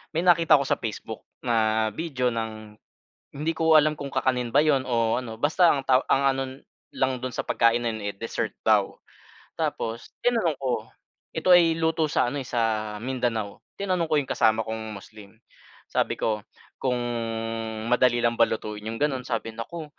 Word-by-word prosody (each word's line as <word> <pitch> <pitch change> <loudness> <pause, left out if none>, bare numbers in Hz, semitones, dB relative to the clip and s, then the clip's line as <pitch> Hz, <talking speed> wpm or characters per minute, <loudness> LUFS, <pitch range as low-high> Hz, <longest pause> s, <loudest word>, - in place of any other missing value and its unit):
may 165 - +1
nakita 170 -2 +5
ako 140 - +2
sa - - +1
Facebook 110 -3 -6 0.2
na 110 -2 +2
video 130 -3 -1
ng 110 -2 -6 0.6
hindi 150 +3 -1
ko 160 -1 +4
alam 155 0 +5
kung 140 -1 -6
kakanin 125 -2 0
ba 145 - +6
'yon 140 -4 +2
o 115 -2 +1
ano 120 -3 -6
basta 160 +5 +4
ang 140 - -1
taw 130 0 +4
ang 135 - +3
ano 135 - -1 0.5
lang 130 -1 0
do'n 130 0 -5
sa - - -2
pagkain 115 +1 +2
na 120 - 0
'yon, 110 -1 -6
eh, - - -26
dessert 115 +4 -4
daw. - - +3 0.6
Tapos 115 +1 -3 0.2
tinanong 225 - +2
ko, 130 -2 -2 0.5
ito - - -1
ay 165 -2 +5
luto 160 -1 +1
sa - - +2
ano, 145 - -3
eh, 130 - -9
sa 110 -3 -1
Mindanao. 115 -3 -3 0.2
Tinanong 185 -4 0
ko - - +2
'yong 140 -3 -1
kasama 110 0 +3
kong 110 -1 -5
Muslim, 105 +1 -14 0.5
sabi - - +1
ko 105 -1 -1 0.4
kung 125 -2 +1 0.9
madali 125 0 +4
lang 120 - +3
ba 115 - -1
lutuin 105 -1 -4
yung 115 - -4
ganun, 140 -2 0
sabi 115 -2 -4
naku 155 +9 -6
125 Hz, 175 wpm, -25 LUFS, 110-150 Hz, 0.9 s, ba